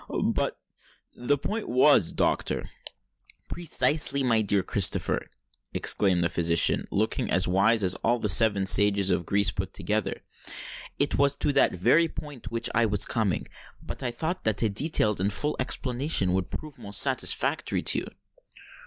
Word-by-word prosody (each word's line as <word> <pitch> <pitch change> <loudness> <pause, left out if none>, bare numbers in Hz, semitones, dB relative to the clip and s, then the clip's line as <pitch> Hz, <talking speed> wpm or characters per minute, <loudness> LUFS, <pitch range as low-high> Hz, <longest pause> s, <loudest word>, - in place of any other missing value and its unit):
"But—the 140 +4 -4
point 215 +9 -4
was, 125 - +4
doctor——" - - -1 0.8
"Precisely, 150 -4 +1
my 115 -3 +2
dear 100 -1 +1
Sir - - -15
Christopher!" - - 0 0.5
exclaimed 95 -4 +2
the - - +2
physician, 85 0 +1
looking - - -1
as 90 +1 +2
wise 100 +4 +2
as 95 -1 +2
all 120 +2 +2
the 110 - -2
seven 100 +1 +4
sages 100 0 +3
of 90 -2 -1
Greece 100 0 +2
put - - -5
together: - - -3 0.7
"it - - 0
was 140 0 +2
to 145 - -1
that 140 - +3
very 155 - +3
point 145 -7 -9
which 115 0 -1
I 115 0 +2
was 105 -2 +1
coming;—but 105 -7 -5
I 125 - -2
thought 160 +9 -4
that 110 0 -1
a 110 - +2
detailed 105 - +1
and 100 +2 0
full 150 +8 -2
explanation 125 - 0
would 95 -1 -2
prove 155 -2 -8
most 100 0 -5
satisfactory - - 0
to - - +1
you." - - -8
110 Hz, 155 wpm, -26 LUFS, 95-140 Hz, 0.8 s, was